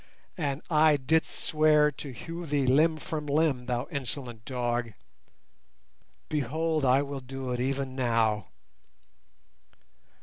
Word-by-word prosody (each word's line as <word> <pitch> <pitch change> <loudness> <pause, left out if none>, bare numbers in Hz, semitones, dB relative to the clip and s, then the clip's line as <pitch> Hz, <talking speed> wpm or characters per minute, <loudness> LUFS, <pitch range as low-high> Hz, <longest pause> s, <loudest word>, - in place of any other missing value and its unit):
And 145 -4 -2
I 155 -2 +5
didst 160 +5 +1
swear 150 -1 +3
to 145 0 -8
hew 165 +6 -7
thee 140 -2 +1
limb 155 +5 +4
from 150 -1 -5
limb, 140 -4 +1
thou 125 0 -1
insolent 130 -5 -5
dog. 120 -3 -2 1.3
Behold, 155 +2 -1
I 130 +2 +4
will 140 -1 -5
do 130 0 -6
it 125 - -2
even 135 +1 -2
now!" 115 -5 +1
140 Hz, 115 wpm, -28 LUFS, 125-155 Hz, 1.3 s, I